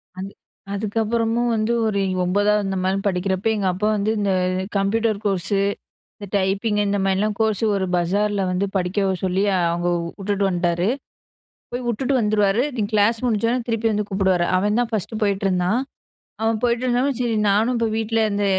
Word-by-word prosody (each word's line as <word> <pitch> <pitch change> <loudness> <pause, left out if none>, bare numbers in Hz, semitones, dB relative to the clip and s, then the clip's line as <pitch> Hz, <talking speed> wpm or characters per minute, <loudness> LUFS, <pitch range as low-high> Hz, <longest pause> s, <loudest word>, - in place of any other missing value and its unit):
அது 190 +1 -6 0.4
அதுக்கப்புறமும் 225 +3 0
வந்து 220 +1 0
ஒரு 200 -2 0 0.2
9ஆவது 205 +3 +2
இந்த 195 0 -2
மாரி 190 +1 +1
படிக்கிறப்ப 190 +1 -1
எங்க 200 -2 0
அப்பா 210 +4 -1
வந்து 205 +2 0
இந்த 200 -1 +1 0.5
கம்ப்யூட்டர் 215 +2 +1
கோர்ஸு 195 0 0 0.6
இந்த 205 - -8
டைப்பிங் 200 +3 0
இந்த 200 0 0
மாரிலாம் 200 +2 +1
கோர்ஸ் 220 -1 +1
ஒரு 190 -1 0
பஜார்ல 200 +4 +1
வந்து 180 +2 0
படிக்க 190 +1 0
சொல்லி, 190 +1 +1 0.3
அவங்க 175 +1 -1 0.3
வுட்டுட்டு 200 0 -1
வந்துட்டாரு 175 0 0 0.9
போய்வுட்டுட்டு 245 +2 -1
வந்துருவாரு. 210 +1 +2
நீ - - -1
கிளாஸ் 215 +2 +3
முடிஞ்சவுடனே 235 +1 +1
திருப்பி 225 0 0
வந்து 210 0 0
கூப்டுவாரு. 190 -3 +1
அவன்தான் 210 +5 +1
ஃபர்ஸ்ட் 220 0 -3
போயிட்ருந்தான். 195 +1 +1 0.6
அவன் 225 0 +1
போயிட்டு 240 0 +1
இருந்தொடனே 255 +3 +1
சரி 235 -2 0
நானும் 220 +5 +2
இப்ப 230 -1 +1
வீட்ல 225 0 0
இருந்த 205 -1 -1
205 Hz, 150 wpm, -22 LUFS, 195-225 Hz, 0.9 s, கிளாஸ்